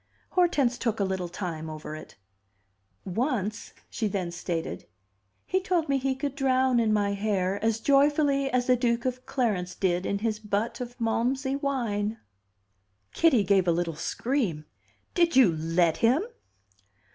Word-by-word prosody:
Hortense 290 -9 +2
took 225 -2 -1
a - - +2
little 190 -2 -2
time 165 -3 -5
over 155 0 -7
it 155 - -11 0.9
"Once," 215 0 -2 0.2
she 225 -4 -2
then 190 -4 -2
stated, 170 -1 -4 0.6
"he 375 +1 0
told 355 -5 0
me 275 -1 +2
he 265 0 0
could 275 +1 -3
drown 260 -2 +2
in 225 -2 +2
my 205 -1 +1
hair 200 -1 -1
as 225 0 +1
joyfully 280 +1 +3
as 250 -1 +1
the 255 - +4
Duke 235 -1 0
of 255 0 -3
Clarence 200 -9 -1
did 180 -1 0
in 200 - 0
his 215 0 -2
butt 215 +3 -2
of 245 0 -7
Malmsey 260 +4 0
wine!" 230 -7 -1 1.0
Kitty 265 -10 +4
gave 190 -1 +3
a - - +5
little 170 -1 -1
scream. 210 - -2 0.5
"Did 340 -3 +2
you 225 -11 +6
let 165 +1 +1
him?" 250 +9 +3
225 Hz, 150 wpm, -27 LUFS, 190-265 Hz, 1.0 s, you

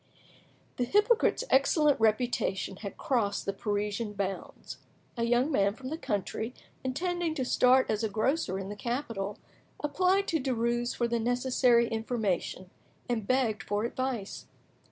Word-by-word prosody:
The 250 - +1
hypocrite's 420 - +3
excellent 290 +1 +4
reputation 215 -4 +1
had 200 -1 -7
crossed 215 -7 0
the 200 - -1
Parisian 210 +1 -2
bounds. 195 -1 -5 0.4
A 235 -1 0
young 245 +5 +2
man 200 -6 +2
from 260 +1 -7
the 315 - -3
country, 220 - -3 0.3
intending 335 +5 -1
to 260 - -1
start 255 +1 +4
as 215 +1 -1
a 220 - +1
grocer 220 - 0
in 195 0 -5
the 205 - -5
capital, 230 -3 -3 0.5
applied 370 +6 +2
to 320 - +1
Derues 240 -2 0
for 240 - 0
the 235 0 0
necessary 245 0 +3
information 220 -5 -2 0.4
and 225 -4 -2
begged 250 -5 +1
for 205 +1 -2
advice. 240 -3 -3
235 Hz, 140 wpm, -29 LUFS, 210-265 Hz, 0.5 s, excellent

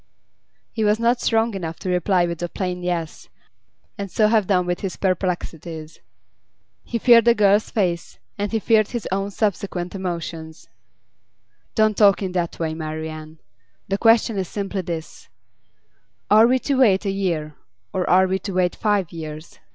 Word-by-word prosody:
He 220 - -2
was 210 +1 +2
not 235 +1 +2
strong 225 0 +1
enough 165 -4 -5
to 190 - -5
reply 180 0 +2
with 170 -1 -5
a 175 - -2
plain 180 -1 -4
'Yes,' 175 -3 -4 0.7
and 200 -1 -4
so 210 +4 +2
have 215 -4 +2
done 180 -3 +2
with 175 0 -2
his 195 -2 -4
perplexities. 170 -4 -3 0.8
He 235 - -3
feared 230 -1 +6
the 235 -1 +5
girl's 205 0 +3
face, 175 -5 -2 0.2
and 205 0 -3
he 225 - +1
feared 220 -1 +3
his 240 -3 -5
own 195 +1 -1
subsequent 195 -3 -2
emotions. 170 -4 -6 1.1
'Don't 215 -1 +2
talk 200 -1 +5
in 185 - -2
that 175 -2 -2
way, 160 -1 -2
Marian. 155 0 -6 0.5
The 195 0 -1
question 225 -2 +3
is 185 - -2
simply 200 0 -3
this: 165 -3 -7 1.0
Are 215 +2 +7
we 255 +2 +3
to 265 +1 -1
wait 210 -6 +4
a 195 - 0
year, 170 -6 -2 0.4
or 185 -1 -1
are 185 +1 +5
we 190 +1 -1
to 195 +1 -6
wait 180 -1 +1
five 205 -5 0
years? 155 -1 -8
190 Hz, 165 wpm, -22 LUFS, 170-210 Hz, 1.1 s, Are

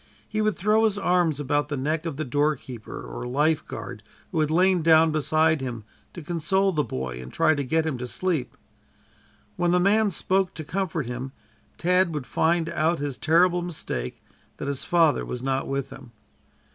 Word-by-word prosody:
He 215 0 -2
would 215 -1 +1
throw 215 +4 +3
his 210 -2 +1
arm 180 -4 +2
about 145 +1 0
the 145 - -2
neck 155 +5 -1
of 150 -4 -5
the 155 - -2
doorkeeper 135 - -2
or - - -6
lifeguard 150 +5 -1 0.3
who - - -1
had 155 -1 +2
lain 180 +2 +3
down 160 0 +5
beside 155 0 +2
him 120 -4 -5 0.3
to 175 - -7
console 190 +5 +1
the 155 -4 +1
boy 65 - -5
and 60 - -10
try - - +3
to 145 -2 -2
get 160 +4 +1
him 145 -6 -2
to 125 - -4
sleep. 165 -2 -2 1.0
When 175 - +1
the 180 +1 +3
man 205 +3 +3
spoke 190 +1 0
to 160 - -5
comfort 165 -2 -2
him, 125 +2 -5 0.4
Tad 180 -1 +2
would 145 -4 -3
find 165 +3 +1
out 165 0 +1
his 145 -2 -3
terrible 175 +4 +3
mistake, 150 - -5 0.3
that - - -5
his 140 -2 -1
father 165 -6 +3
was 125 0 -5
not 135 0 -1
with 135 0 -3
him. 135 -3 -12
155 Hz, 185 wpm, -25 LUFS, 135-175 Hz, 1.0 s, down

